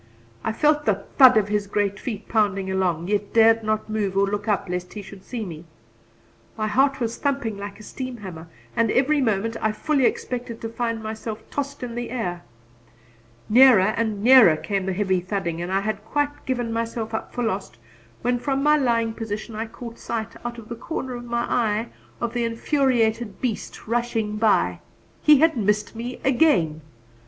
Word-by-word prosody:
I - - 0
felt 300 +6 +2
the 200 -2 +1 0.2
thud 255 -3 +9
of 210 -2 +3
his 205 -1 0
great 200 0 -1
feet 220 -4 -5
pounding 195 -3 +1
along, 180 -3 0
yet 205 0 -1
dared 225 0 +6
not 215 0 -1
move 205 -3 -2
or 200 - +4
look 205 +1 -3
up 205 -2 0
lest 180 0 -4
he 210 - -7
should 195 0 -12
see 235 -4 -5
me. 165 -3 -8 0.9
My 215 - -1
heart 270 +5 +2
was 235 -1 -2
thumping 275 -7 -1
like 200 0 -7
a - - -11
steam 255 +3 -6
hammer, 175 -6 -9 0.3
and 230 -2 +2
every 280 +5 +3
moment 225 -1 0
I 215 - +2
fully 270 +3 +2
expected 240 -2 -4
to 225 - -4
find 230 -1 -3
myself 220 0 -6
tossed 280 -2 -4
into 240 -1 -5
the 240 0 -4
air. 180 -8 -3 1.1
Nearer 220 -4 +6
and 215 -3 -1
nearer 235 -10 +8
came 195 +2 -2
the 190 - 0
heavy 190 -1 +1
thudding 180 -2 -3
and 175 +2 -4
I 195 +1 +2
had 210 0 -3
quite 290 +5 -2
given 245 -3 -1
myself 230 -1 -3
up 220 - -4
for 245 - -3
lost, 190 - -3 0.5
when 245 +1 +1
from 275 +1 -1
my 300 +1 +5
lying 230 -5 +1
position 220 0 -5
I 220 +1 -4
caught 230 +1 -10
sight, 225 -1 -4
out 240 0 -5
of 225 -2 -10
the 235 - -5
corner 260 +1 -5
of 240 0 -7
my 235 0 -1
eye, 225 -1 0 0.3
of 235 -1 -2
the 240 -1 0
infuriated 230 -3 0
beast 240 -5 -4
rushing 230 -2 -1
by. 220 -1 +2 0.4
He 300 -2 +6
had 325 -1 +4
missed 210 -1 0
me 240 +2 -5
again! 215 - +3
225 Hz, 185 wpm, -23 LUFS, 205-245 Hz, 1.1 s, thud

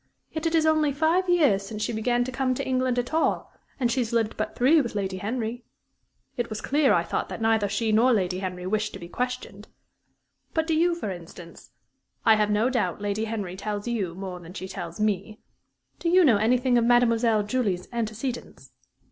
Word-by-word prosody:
Yet 315 +1 -2
it 330 - 0
is 320 -1 +3
only 310 -2 +3
five 325 +6 +1
years 295 - +4
since 210 +2 -5
she - - -2
began 240 +2 +1
to 255 - -5
come 255 0 0
to - - -3
England 255 -1 +1
at 245 +4 -2
all; 320 - 0 0.3
and 240 -3 +1
she 260 - 0
has 235 -2 -1
lived 225 -2 0
but - - -3
three 295 +6 +5
with 235 -5 -5
Lady 190 -2 -2
Henry. 230 +4 -3 0.7
It 240 -1 -2
was 215 -1 -4
clear, 285 -1 +2
I - - +3
thought, - - -3
that - - -6
neither 220 -2 +2
she 220 +2 0
nor 230 +4 +4
Lady 185 -5 +1
Henry 180 -1 -5
wished 210 +2 -1
to - - -7
be 170 - -8
questioned. 245 -2 -4 0.9
But, 320 -1 +2
do 325 - 0
you, 340 +2 +3
for 270 - -4
instance 170 -1 -11 0.6
I 225 - +7
have 210 -1 +1
no 210 +3 +2
doubt 250 -5 -1
Lady 205 +2 -2
Henry 205 -5 -4
tells 205 +2 -4
you 200 -8 -2
more 185 -1 -6
than 175 +2 -12
she 190 - -5
tells 175 -2 -7
me 210 0 -1 0.6
do 335 - 0
you 365 0 +6
know 235 -7 +5
anything 245 +3 +3
of - - +1
Mademoiselle 230 -2 +3
Julie's 205 -5 -1
antecedents?" 230 - -4
225 Hz, 205 wpm, -26 LUFS, 205-255 Hz, 0.9 s, I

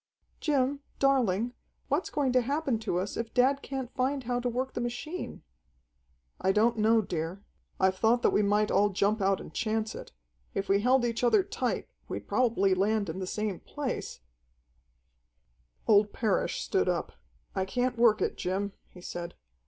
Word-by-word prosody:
"Jim, 280 -2 +1 0.2
darling, 245 -4 +2 0.3
what's 290 +7 0
going 280 -3 0
to 255 - +5
happen 275 -1 0
to 215 -5 -1
us 185 +3 -2
if 230 -1 -4
dad 265 +2 +4
can't 265 -3 -5
find 270 +1 0
how 245 0 -1
to 245 0 -1
work 255 +2 -2
the - - -3
machine?" 240 +9 -5 1.0
"I 190 - +2
don't 225 +3 +2
know, 220 +1 +4
dear. 175 +2 -4 0.4
I've 190 0 +2
thought 235 +2 +3
that - - +4
we - - +3
might 210 +1 +2
all 205 +1 +4
jump 205 +2 +1
out 195 0 +2
and - - -10
chance 220 -1 -1
it. - - -9 0.4
If 195 - -1
we 200 +1 +4
held 250 +2 +4
each 235 0 -2
other 375 - +5
tight, 425 +4 -2 0.2
we'd - - -5
probably 225 -6 +2
land 200 +1 +1
in 180 - -6
the 185 - -4
same 210 -1 -2
place 280 - -5 0.8
" - - -42
Old 205 -1 +5
Parrish 215 -4 0
stood - - +1
up. - - -1 0.4
"I 190 - 0
can't 245 +6 -1
work 230 -2 +4
it, - - -1
Jim," 195 +2 -2 0.2
he 180 - -14
said. 175 -1 -6
225 Hz, 175 wpm, -29 LUFS, 195-255 Hz, 1.0 s, to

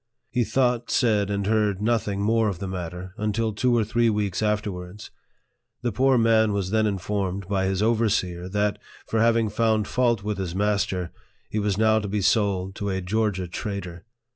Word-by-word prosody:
He 125 -1 +1
thought, 120 0 +1
said, 105 -5 +2
and 100 -1 -1
heard 105 -2 +1
nothing 105 -2 0
more 110 +1 +2
of 95 - -4
the 95 - -5
matter, 90 0 -6
until 110 +1 0
two 120 +3 +2
or 115 - +3
three 115 +2 +2
weeks 105 -3 -1
after 105 -1 0
wards. 90 +3 -9 0.7
The 120 - 0
poor 130 +4 +3
man 110 -2 +3
was 100 -2 -2
then 110 0 +2
informed 100 -1 -2
by 95 -1 0
his 95 +1 0
over 115 0 +2
Beer 90 -3 -2
that, 105 +1 0 0.3
for 110 - -1
having 115 -1 +3
found 110 -1 +1
fault 120 -5 +1
with 105 -1 -3
his 90 -2 -3
master, 100 -3 0 0.4
he 110 - -1
was 100 -2 0
now 110 0 +4
to 105 - -4
be 100 +1 -1
sold 95 -2 +1
to 100 - -2
a 95 -1 -1
Georgia 95 -1 -1
trader. 90 -2 -5
105 Hz, 190 wpm, -25 LUFS, 95-110 Hz, 0.7 s, now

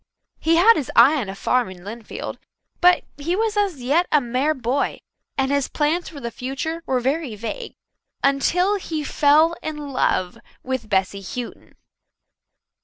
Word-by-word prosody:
He 325 +1 +2
had 425 +7 +6
his 275 - -3
eye 305 +3 +7
on 205 - -5
a 195 - -6
farm 250 +2 +1
in 180 -1 -12
Lynnfield, 220 +2 -7 0.4
but 360 0 +5 0.2
he 335 +5 -1
was 440 +1 0
as 390 -11 0
yet 310 +8 +2
a 300 - +5
mere 260 +5 0
boy, 260 +2 -1 0.4
and 270 0 +1
his 280 -1 +1
plans 315 +4 0
for 310 -3 -10
the 235 -3 -5
future 270 +7 -4
were 255 - +1
very 270 -1 -1
vague 235 - -6 0.5
until 355 +9 +2
he 320 -5 -4
fell 305 +3 +4
in 300 -2 -5
love 185 -7 0 0.2
with 255 -4 -3
Bessy 195 0 0
Houghton. 235 +6 -7
280 Hz, 160 wpm, -22 LUFS, 245-330 Hz, 0.5 s, eye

